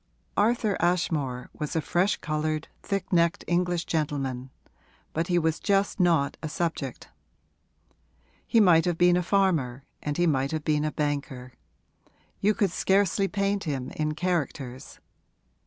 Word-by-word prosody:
Arthur 215 0 +2
Ashmore 160 -8 0
was 150 0 -5
a - - +3
fresh 180 +6 +1
coloured, 155 0 -2
thick 195 -2 -3
necked 170 -1 +2
English 175 0 0
gentleman, 135 -5 -2 0.6
but 165 +2 -1
he 175 - +2
was 160 -1 +1
just 200 0 +1
not 165 -6 +2
a 155 - -4
subject; 155 -5 -3 1.4
he 230 - +4
might 175 -6 +6
have 175 -2 0
been 175 0 +5
a 180 - +2
farmer 170 -9 +1 0.2
and 145 -1 -3
he 175 - +3
might 135 -4 +1
have 155 -1 -2
been 150 0 +1
a 155 - -1
banker: 140 -4 -3 0.9
you 210 +1 +2
could 200 -6 +1
scarcely 195 +1 +2
paint 200 0 -1
him 135 -5 -3
in 155 0 -2
characters. 150 -7 -3
165 Hz, 140 wpm, -27 LUFS, 145-180 Hz, 1.4 s, might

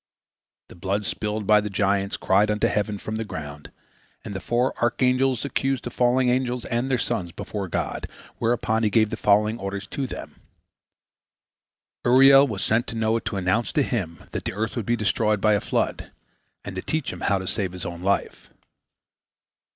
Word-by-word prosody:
The - - -12
blood 100 +3 -2
spilled 105 +1 -3
by 105 +1 +5
the 105 - -4
giants 100 0 0
cried 100 +3 +3
unto 105 0 +1
heaven 105 0 0
from 110 +2 -5
the 115 - -2
ground, 75 -7 -8 0.5
and 100 - -5
the 95 - -4
four 120 +2 +1
archangels 125 +2 +2
accused 135 -2 -1
the 120 - -5
fallen 125 +1 +2
angels 125 -1 0
and 120 +3 -1
their 130 - +2
sons 100 -8 -2
before 100 +3 -5
God, - - -3 0.3
whereupon 115 -1 +1
He 110 - +2
gave 110 +1 +3
the - - -1
following 105 +2 +2
orders 100 0 -4
to 140 -3 -3
them: - - -9 1.6
Uriel 135 +3 +7
was 105 -6 -3
sent 110 +2 +1
to - - -5
Noah 110 0 +1
to 115 -3 -4
announce 95 +5 0
to 150 -4 +3
him 90 -11 -3
that - - -5
the - - -2
earth 110 +3 -3
would 115 -5 -3
be 120 - +3
destroyed 105 -1 +1
by 105 +2 +3
a 100 - +1
flood, - - -1 0.6
and 95 - -6
to 95 - -3
teach 155 +5 -2
him - - -9
how 100 - +2
to 95 - -5
save 95 -1 -2
his 90 -2 -5
own 85 0 -6
life. 100 +2 -1
110 Hz, 185 wpm, -24 LUFS, 100-120 Hz, 1.6 s, Uriel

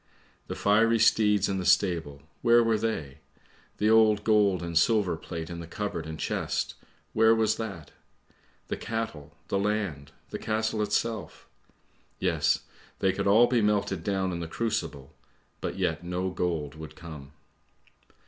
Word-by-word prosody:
"The - - -4
fiery 115 +3 +3
steeds 105 -3 +4
in 95 -1 -1
the - - -3
stable, 85 -6 +1 0.2
where 120 0 +5
were 115 -1 +2
they? 80 -11 -3 0.6
The 105 - +1
old 110 -2 +5
gold 100 -5 +3
and 85 -1 -5
silver 100 +1 +3
plate 80 0 -6
in 85 0 -6
cupboard 85 -3 -4
and 80 0 -7
chest, - - -2 0.4
where 110 +1 +5
was 110 -1 +1
that? 95 -10 -6 0.8
The - - -2
cattle, 75 -11 -5
the 100 - +1
land, 100 -9 -2 0.2
the - - -4
castle 110 0 -1
itself? 105 +1 -2 0.7
Yes, - - +1 0.4
they 95 -1 +1
could - - -2
all 110 +4 +7
be 120 -1 +2
melted 100 -4 0
down 95 -1 0
in 85 - -4
the 85 - -4
crucible, 80 -9 -3 0.5
but - - -4
yet - - -1
no 90 +1 -2
gold 85 -5 -2
would 80 0 -10
come. 75 -5 -10
95 Hz, 150 wpm, -28 LUFS, 80-110 Hz, 0.8 s, all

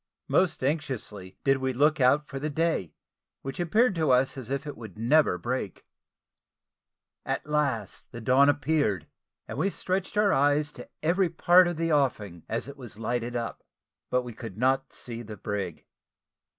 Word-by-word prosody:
Most 180 -7 +2
anxiously 130 - -3
did 135 0 +3
we 130 0 -1
look 150 +3 +3
out 140 +4 +4
for 135 - -6
the 150 +3 -2
day 155 - -1 0.5
which 135 +4 -6
appeared 215 +7 +3
to 160 -4 0
us 130 +2 +3
as 130 -3 -7
if 140 +1 -2
it 115 - -8
never 135 +6 +4
would 90 -1 -7
break. 120 -7 -3 1.4
At - - -2
last 150 -6 -1
the 120 - -7
dawn 130 +5 +5
appeared, 145 - +1 0.4
and - - -5
we 195 - +2
stretched 190 +1 -3
our 210 -2 +4
eyes 145 +1 +3
to - - -11
every 175 +3 +2
part 175 +2 +5
of 175 -2 -3
the 165 0 0
offing 105 - 0
as 115 +3 -2
it 140 +1 -9
was 120 -6 -10
lighted 120 +2 -2
up; 115 -1 -4 0.5
but 125 0 +1
we 120 -1 -7
could 110 -3 -8
not 135 +2 +1
see 120 -1 -5
the 110 -2 -9
brig. 100 -4 -4
135 Hz, 170 wpm, -27 LUFS, 115-155 Hz, 1.4 s, dawn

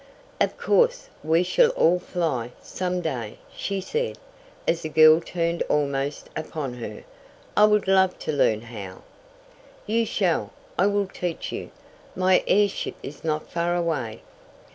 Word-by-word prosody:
"Of - - +1
course, - - +2
we 160 +3 +3
shall 465 - +4
all 180 +2 +4
fly, 150 -10 -2
some 180 -1 -3
day," 125 -10 -4 0.2
she 195 -1 -2
said, 465 - -2 0.5
as 170 0 +1
the 155 - -4
girl 155 +1 +7
turned 170 0 -2
almost 140 -1 -1
upon 155 -4 -4
her. 115 -3 -7 0.5
"I 210 - +7
would 210 -2 +3
love 190 -1 +4
to - - -2
learn 110 -7 +2
how!" 105 -5 -9 0.8
"You 225 +1 +1
shall! 180 -6 0 0.2
I 190 - +3
will 205 0 +1
teach 180 -3 -4
you! - - -5 0.5
My 185 0 +3
airship 205 0 +2
is 145 - -8
not 155 -1 -2
far 170 +1 0
away." 150 -11 -2
170 Hz, 140 wpm, -25 LUFS, 145-190 Hz, 0.8 s, girl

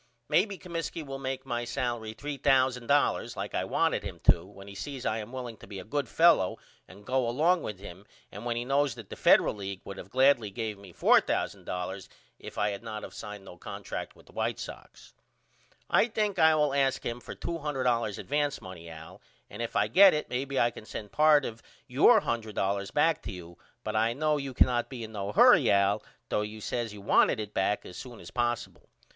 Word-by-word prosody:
Maybe 200 +2 +2
Comiskey 165 -3 -5
will 135 -1 -6
make 130 0 -4
my 120 -2 -2
salery 120 -3 -3
$3000 135 -1 +1
like - - -5
I - - 0
wanted - - +1
him - - -7
to 85 - +5
when 100 0 -13
he 100 - -9
sees 135 +5 -6
I 110 - 0
am 110 +2 -7
willing 125 -3 -6
to - - -14
be 100 -1 -8
a 95 - -6
good 140 +3 -2
fellow 160 - +4 0.3
and 100 +2 -15
go 130 -1 +1
along 165 +8 +2
with 105 - -5
him 95 +1 -11 0.2
and 105 +2 -8
when 120 -1 -1
he 120 +1 -2
knows 140 -1 +1
that 115 -5 -11
the - - -5
Federal - - +5
League 100 -2 -6
would 100 0 -7
of 90 - -10
gladly 130 -3 +4
gave 105 0 -4
me 100 -2 -13
$4000 90 +2 0 0.3
if - - -10
I 105 0 +1
had 100 - -6
not 110 -2 -6
of - - -8
signed 105 -2 -8
no 90 - -11
contract - - -6
with - - -19
the - - -18
White - - -2
Sox. - - -10 0.7
I - - +4
think 215 -3 -1
I 160 0 +6
will 150 -2 +2
ask 135 -2 +1
him 120 +1 -3
for - - -9
$200 130 -9 -1
advance 145 0 -1
money 90 -3 -10
Al 80 0 -11 0.3
and 105 - -7
if 115 - -4
I - - +3
get 195 -2 +7
it 150 - -4
may 125 +2 -1
be 140 -1 -2
I 120 - +3
can 110 - -11
send 105 -2 -7
part 150 +2 +5
of 115 +1 -6 0.2
your - - +5
$100 100 -4 -2
back 160 +2 +3
to - - -6
you 85 -2 -10 0.3
but 110 0 -3
I 110 +2 +2
know 150 +3 +1
you 135 -3 -5
cannot 120 -1 +3
be 125 -3 -6
in 110 - -8
no 100 -2 -4
hurry - - +6
Al 100 +1 +3 0.3
though - - +1
you 105 +1 -6
says 115 +1 -3
you 105 -1 -10
wanted 100 - +3
it 105 -1 -5
back 100 +2 0
as 90 - -10
soon 125 -3 -9
as - - -11
possible. 120 -1 -2
120 Hz, 210 wpm, -29 LUFS, 105-140 Hz, 0.7 s, get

